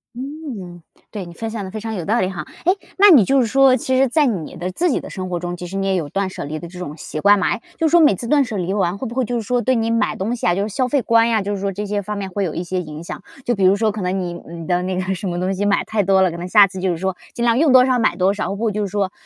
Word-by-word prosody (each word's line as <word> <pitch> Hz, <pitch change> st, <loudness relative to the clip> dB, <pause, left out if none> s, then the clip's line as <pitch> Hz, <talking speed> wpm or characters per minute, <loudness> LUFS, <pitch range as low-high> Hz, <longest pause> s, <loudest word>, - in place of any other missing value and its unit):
嗯。 245 Hz, -, -7 dB, 0.3 s
对， 205 Hz, -3 st, -5 dB
你 170 Hz, -, -10 dB
分 225 Hz, +6 st, -5 dB
享 220 Hz, -3 st, -5 dB
的 190 Hz, -, -7 dB
非 215 Hz, -, -5 dB
常 220 Hz, +1 st, -4 dB
有 180 Hz, -5 st, -4 dB
道 225 Hz, +6 st, +1 dB
理 185 Hz, -, +1 dB
哈。 190 Hz, -2 st, -5 dB, 0.2 s
哎， 360 Hz, -, +5 dB, 0.2 s
那 405 Hz, +1 st, +7 dB
你 275 Hz, -, +8 dB
就 270 Hz, +6 st, +3 dB
是 245 Hz, -, +2 dB
说 270 Hz, +2 st, +5 dB
其 260 Hz, 0 st, -1 dB
实 270 Hz, -, +4 dB
在 295 Hz, +4 st, +3 dB
你 190 Hz, -, -3 dB
的 175 Hz, +2 st, -4 dB
自 345 Hz, -, 0 dB
己 -, -, 0 dB
的 -, -, -10 dB
生 185 Hz, -1 st, -5 dB
活 175 Hz, -1 st, -3 dB
中， 175 Hz, 0 st, -4 dB
其 180 Hz, -, -7 dB
实 190 Hz, +3 st, -6 dB
你 195 Hz, 0 st, -1 dB
也 190 Hz, -1 st, +1 dB
有 160 Hz, -5 st, -2 dB
断 195 Hz, +3 st, -2 dB
舍 -, -, -6 dB
离 155 Hz, +2 st, -5 dB
的 170 Hz, -, -8 dB
这 180 Hz, +1 st, -11 dB
种 155 Hz, -4 st, -6 dB
习 155 Hz, -, -6 dB
惯 205 Hz, +5 st, +5 dB
嘛。 175 Hz, -, +1 dB
哎， -, -, -2 dB, 0.2 s
就 325 Hz, -, +1 dB
是 -, -, -3 dB
说 340 Hz, +2 st, +6 dB
每 300 Hz, -9 st, +5 dB
次 235 Hz, -, -6 dB
断 290 Hz, 0 st, +4 dB
舍 235 Hz, -4 st, -5 dB
离 185 Hz, 0 st, -2 dB
完， 190 Hz, -2 st, 0 dB
会 255 Hz, +4 st, -5 dB
不 235 Hz, -, -8 dB
会 260 Hz, 0 st, +1 dB
就 245 Hz, -, -3 dB
是 230 Hz, -, -1 dB
说， 245 Hz, +3 st, 0 dB
对 260 Hz, +2 st, +1 dB
你 230 Hz, -1 st, 0 dB
买 230 Hz, 0 st, +1 dB
东 215 Hz, +6 st, -2 dB
西 -, -, -3 dB
啊， 175 Hz, -, +3 dB
就 195 Hz, -, -1 dB
是 205 Hz, -, -2 dB
消 255 Hz, +5 st, 0 dB
费 275 Hz, +1 st, +1 dB
观 230 Hz, 0 st, +3 dB
呀， 225 Hz, -3 st, +1 dB
就 205 Hz, +1 st, -2 dB
是 200 Hz, -, -5 dB
说 200 Hz, 0 st, -2 dB
这 205 Hz, +3 st, -4 dB
些 205 Hz, 0 st, -1 dB
方 210 Hz, +2 st, -5 dB
面 195 Hz, -1 st, -5 dB
会 200 Hz, +2 st, -2 dB
有 165 Hz, -, -3 dB
一 170 Hz, -, -3 dB
些 180 Hz, +1 st, -3 dB
影 155 Hz, -2 st, -8 dB
响？ 170 Hz, -, -7 dB, 0.2 s
就 240 Hz, -, +1 dB
比 195 Hz, -, +1 dB
如 185 Hz, +1 st, +6 dB
说 220 Hz, +1 st, +1 dB
可 210 Hz, -1 st, -5 dB
能 185 Hz, +1 st, -1 dB
你 175 Hz, -1 st, -4 dB
嗯， 170 Hz, 0 st, -8 dB
你 -, -, -8 dB
的 180 Hz, 0 st, +1 dB
那 185 Hz, +1 st, -2 dB
个 185 Hz, +1 st, -2 dB
什 195 Hz, +2 st, -6 dB
么 175 Hz, 0 st, -3 dB
东 185 Hz, +1 st, 0 dB
西 195 Hz, +1 st, -2 dB
买 205 Hz, 0 st, +2 dB
太 220 Hz, -2 st, 0 dB
多 190 Hz, 0 st, +3 dB
了， 185 Hz, -, +3 dB
可 170 Hz, -, -7 dB
能 175 Hz, +1 st, -5 dB
下 205 Hz, +1 st, +7 dB
次 190 Hz, 0 st, -7 dB
就 190 Hz, 0 st, 0 dB
是 175 Hz, -, -1 dB
说， 190 Hz, +1 st, -2 dB, 0.2 s
尽 235 Hz, -, -2 dB
量 235 Hz, 0 st, +3 dB
用 300 Hz, -2 st, +4 dB
多 255 Hz, -1 st, +7 dB
少 255 Hz, -1 st, +2 dB
买 225 Hz, -, +2 dB
多 190 Hz, +1 st, +2 dB
少， 205 Hz, -1 st, -3 dB
不 220 Hz, +2 st, -1 dB
就 210 Hz, +1 st, -2 dB
是 -, -, -5 dB
说 195 Hz, -1 st, -1 dB
200 Hz, 385 characters per minute, -20 LUFS, 180-235 Hz, 0.3 s, 你